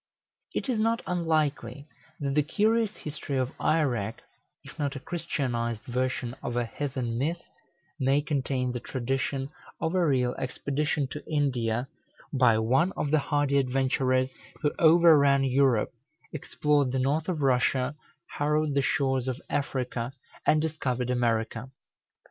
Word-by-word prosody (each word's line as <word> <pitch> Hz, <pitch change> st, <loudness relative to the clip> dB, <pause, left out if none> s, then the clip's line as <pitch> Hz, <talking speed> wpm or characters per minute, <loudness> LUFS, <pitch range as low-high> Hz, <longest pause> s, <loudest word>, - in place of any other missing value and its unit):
It -, -, -2 dB
is 245 Hz, -4 st, 0 dB
not 225 Hz, +1 st, +1 dB
unlikely 155 Hz, -4 st, -1 dB, 0.3 s
that 140 Hz, -2 st, -1 dB
the 150 Hz, -, +4 dB
curious 215 Hz, +7 st, +1 dB
history 150 Hz, -2 st, -4 dB
of 130 Hz, 0 st, 0 dB
Eirek, 120 Hz, -9 st, 0 dB, 0.4 s
if -, -, -13 dB
not 145 Hz, -1 st, -1 dB
a -, -, -4 dB
Christianized 125 Hz, -8 st, -3 dB
version 125 Hz, -1 st, -2 dB
of 120 Hz, -, -4 dB
a 120 Hz, -, +1 dB
heathen 125 Hz, -2 st, -3 dB
myth, 165 Hz, +6 st, -1 dB, 0.6 s
may 135 Hz, +1 st, +3 dB
contain 135 Hz, -4 st, -1 dB
the 125 Hz, -, -3 dB
tradition 135 Hz, +2 st, -2 dB, 0.3 s
of 160 Hz, -, -1 dB
a 185 Hz, -1 st, +3 dB
real 130 Hz, -5 st, +2 dB
expedition 140 Hz, +2 st, -1 dB
to 150 Hz, -, -6 dB
India, 125 Hz, -5 st, 0 dB, 0.5 s
by 125 Hz, -5 st, +4 dB
one 130 Hz, +12 st, +2 dB
of 145 Hz, -, -2 dB
the 155 Hz, -, +4 dB
hardy 145 Hz, -1 st, +1 dB
adventurers 130 Hz, 0 st, +1 dB, 0.3 s
who 150 Hz, -, +2 dB
overran 155 Hz, -4 st, +6 dB
Europe, 130 Hz, -3 st, +2 dB, 0.4 s
explored 145 Hz, -2 st, +1 dB
the 130 Hz, -, -1 dB
north 145 Hz, +6 st, 0 dB
of 160 Hz, -5 st, -1 dB
Russia, 130 Hz, +1 st, +2 dB, 0.4 s
harrowed 150 Hz, 0 st, +1 dB
the 140 Hz, -, +2 dB
shores 135 Hz, -2 st, 0 dB
of 130 Hz, -1 st, -2 dB
Africa, 130 Hz, -3 st, -2 dB, 0.3 s
and 155 Hz, 0 st, +4 dB
discovered 130 Hz, -6 st, -1 dB
America. 115 Hz, 0 st, 0 dB
135 Hz, 135 wpm, -28 LUFS, 125-150 Hz, 0.6 s, overran